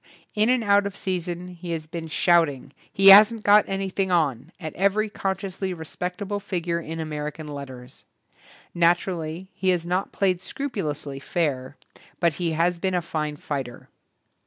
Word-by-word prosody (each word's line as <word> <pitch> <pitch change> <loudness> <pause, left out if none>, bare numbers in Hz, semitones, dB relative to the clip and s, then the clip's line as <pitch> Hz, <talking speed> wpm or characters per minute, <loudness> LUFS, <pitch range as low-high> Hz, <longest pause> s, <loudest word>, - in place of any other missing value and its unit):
In 215 +2 +2
and 250 -2 +2
out 200 -1 +3
of 200 - -8
season 180 -1 -3
he 175 -1 -9
has 160 -1 -4
been 165 +1 -6
shout 170 0 +3
ing, 135 0 -10 0.2
"He 195 0 +6
hasn't 215 +3 +8
got 205 +1 +6
anything 195 0 -1
on", 150 -5 0
at 160 -4 -6
every 200 +3 +1
consciously 190 -1 -3
respectable 180 +5 -4
figure 175 -4 -2
in 165 0 -6
American 150 0 -5
letters. 130 -3 -9 0.7
Naturally, 175 0 0
he 190 - -1
has 175 -2 +1
not 180 +3 -1
played 185 -3 0
scrupulously 155 - -4
fair, 140 -3 -2 0.4
but 170 -2 +2
he 165 -2 0
has 170 +2 +1
been 190 0 0
a 180 - +1
fine 155 -2 -3
fighter. 135 -5 -6
175 Hz, 155 wpm, -24 LUFS, 155-195 Hz, 0.7 s, hasn't